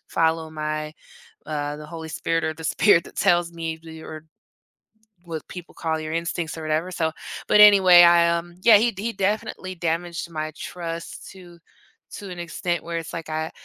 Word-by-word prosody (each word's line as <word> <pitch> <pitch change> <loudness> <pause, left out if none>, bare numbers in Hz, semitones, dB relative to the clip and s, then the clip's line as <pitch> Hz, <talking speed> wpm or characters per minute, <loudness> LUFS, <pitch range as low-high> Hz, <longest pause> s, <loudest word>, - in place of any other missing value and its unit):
follow 160 -1 0
my, 155 0 -4 0.5
uh, 145 -1 -3
the 150 0 -10
Holy 160 0 -8
Spirit 165 +1 -1
or 160 - -1
the 160 - -11
spirit 170 +1 +4
that - - -15
tells 175 -1 +2
me 165 -1 -5 0.2
or 155 0 -9 1.0
what 160 -3 -7
people 180 -2 -10
call 160 -1 -2
your 155 0 -5
instincts 165 -1 -3
or 160 - -7
whatever. 155 +3 -1
So, 160 -3 -1 0.4
but 210 - +4
anyway, 190 -4 +8
I, 170 0 +6
um, 175 +1 -8
yeah, 225 -3 +8
he 235 +3 +2
he 225 +4 -3
definitely 195 -2 -2
damaged 170 0 -3
my 155 0 -3
trust 170 -1 -7
to 175 -3 -15 0.6
to 200 -2 -8
an 180 - -8
extent 175 0 -3
where 170 0 -4
it's 165 - -8
like 165 -1 -6
I 155 0 -2
I - - -11
165 Hz, 180 wpm, -23 LUFS, 160-175 Hz, 1.0 s, anyway